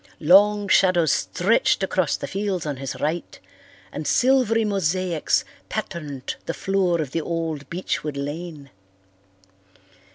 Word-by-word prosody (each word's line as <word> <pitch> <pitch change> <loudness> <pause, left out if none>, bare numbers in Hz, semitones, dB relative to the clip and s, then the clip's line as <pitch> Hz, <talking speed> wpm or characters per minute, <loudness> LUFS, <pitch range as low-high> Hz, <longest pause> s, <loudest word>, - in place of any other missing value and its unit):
Long 205 +5 +5
shadows 180 -4 +4
stretched - - +1
across - - 0
the - - -5
fields 195 -4 -2
on 145 -3 -3
his 135 0 -5
right 160 +4 -3 0.5
and - - -5
silvery 245 -4 +3
mosaics 185 -4 0 0.2
patterned 145 -6 -5
the 165 - -2
floor 190 -3 +1
of 145 -4 -5
the 165 - -1
old 160 -3 -4
beechwood 155 -4 -3
lane. 145 0 -6
170 Hz, 120 wpm, -23 LUFS, 150-195 Hz, 0.5 s, Long